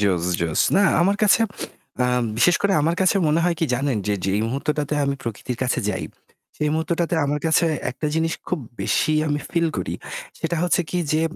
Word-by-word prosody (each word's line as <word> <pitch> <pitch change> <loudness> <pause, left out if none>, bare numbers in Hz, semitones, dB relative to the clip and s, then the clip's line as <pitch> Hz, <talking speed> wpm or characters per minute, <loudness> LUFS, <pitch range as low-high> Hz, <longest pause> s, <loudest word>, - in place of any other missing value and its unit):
জোস, 95 -4 +1 0.2
জোস। 85 -2 0 0.2
না - - +5 0.2
আমার 195 +4 +3
কাছে 210 +1 +5 0.6
আ - - +3 0.3
বিশেষ 175 +9 +4
করে 200 -1 +3
আমার 165 +3 +2
কাছে 190 +1 +3
মনে 155 +2 +2
হয় 175 -1 +2
কি 165 - +3
জানেন 135 0 0
যে 105 - +1
যেই 100 +2 +1
মুহূর্তটাতে 145 +4 -2
আমি 140 0 0
প্রকৃতির 115 +2 -5
কাছে 125 -1 0
যাই 100 - -2 0.5
সেই 150 -1 0
মুহূর্তটাতে 165 +2 0
আমার 145 +1 -1
কাছে 160 +1 +3 0.2
একটা 140 +5 -4
জিনিস 165 0 +1 0.2
খুব 180 - -1 0.2
বেশি 155 - +1 0.2
আমি 145 - 0
feel 170 -1 +1
করি। - - -3 0.4
সেটা 170 - -2
হচ্ছে 180 0 +2
কি 180 - -1
যে 155 +1 +2
150 Hz, 190 wpm, -22 LUFS, 125-170 Hz, 0.6 s, না